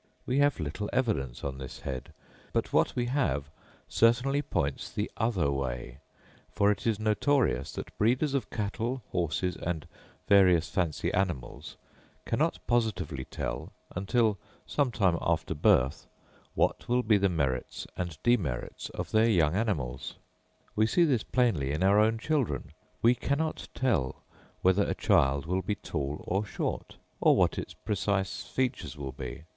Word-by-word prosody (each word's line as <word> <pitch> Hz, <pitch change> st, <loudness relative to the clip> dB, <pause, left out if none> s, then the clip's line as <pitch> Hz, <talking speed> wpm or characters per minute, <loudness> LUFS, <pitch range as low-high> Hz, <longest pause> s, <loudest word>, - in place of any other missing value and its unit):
We 130 Hz, +3 st, +1 dB
have 145 Hz, -5 st, +3 dB
little 85 Hz, +7 st, -3 dB
evidence 105 Hz, -, -1 dB
on 70 Hz, -1 st, -4 dB
this 65 Hz, -, -8 dB
head, 65 Hz, -2 st, -5 dB, 0.4 s
but -, -, -1 dB
what -, -, +3 dB
we 120 Hz, -, 0 dB
have 120 Hz, -, 0 dB, 0.4 s
certainly 120 Hz, +5 st, +3 dB
points 70 Hz, -, -2 dB
the 105 Hz, -, -3 dB
other 100 Hz, -11 st, +1 dB
way; 60 Hz, -2 st, -3 dB, 0.5 s
for 100 Hz, 0 st, +3 dB
it 105 Hz, -, -3 dB
is 110 Hz, -2 st, +1 dB
notorious 115 Hz, +6 st, +1 dB
that -, -, -7 dB
breeders 130 Hz, +7 st, +2 dB
of 140 Hz, -, -1 dB
cattle, 115 Hz, +4 st, -2 dB
horses 90 Hz, +1 st, 0 dB
and 80 Hz, -3 st, -3 dB, 0.4 s
various 90 Hz, -4 st, +5 dB
fancy 85 Hz, -5 st, -1 dB
animals, 85 Hz, -10 st, -2 dB, 0.5 s
cannot -, -, +1 dB
positively 100 Hz, -, 0 dB
tell, -, -, -5 dB, 0.2 s
until 105 Hz, +2 st, +1 dB, 0.3 s
some 140 Hz, -3 st, +1 dB
time 95 Hz, -8 st, +2 dB
after -, -, 0 dB
birth, 65 Hz, +3 st, +2 dB, 0.5 s
what -, -, 0 dB
will 125 Hz, +1 st, +3 dB
be 105 Hz, -3 st, +4 dB
the 100 Hz, 0 st, +3 dB
merits 70 Hz, -7 st, -2 dB
and 90 Hz, -4 st, -4 dB
demerits 85 Hz, -, 0 dB
of -, -, -4 dB
their 110 Hz, +1 st, +4 dB
young 80 Hz, -7 st, +3 dB
animals. 90 Hz, -, -2 dB, 0.6 s
We 110 Hz, +1 st, +3 dB
see 175 Hz, +9 st, +3 dB
this 135 Hz, -9 st, +3 dB
plainly 110 Hz, -, +1 dB
in 80 Hz, +5 st, -1 dB
our 100 Hz, +2 st, +5 dB
own 110 Hz, +1 st, +3 dB
children; 115 Hz, -, -1 dB, 0.3 s
we 120 Hz, +2 st, +7 dB
cannot 145 Hz, +5 st, -2 dB
tell 95 Hz, -, 0 dB, 0.4 s
whether 95 Hz, +2 st, +4 dB
a -, -, 0 dB
child 70 Hz, +2 st, +3 dB
will 90 Hz, +3 st, 0 dB
be 105 Hz, -, -2 dB
tall 75 Hz, -5 st, -4 dB
or 95 Hz, +3 st, +1 dB
short, 105 Hz, -, -4 dB, 0.2 s
or -, -, +5 dB
what -, -, +2 dB
its -, -, -7 dB
precise 100 Hz, -1 st, -1 dB
features 125 Hz, -, -2 dB
will 70 Hz, -2 st, -5 dB
be. 65 Hz, +4 st, -7 dB
100 Hz, 150 wpm, -29 LUFS, 75-120 Hz, 0.6 s, we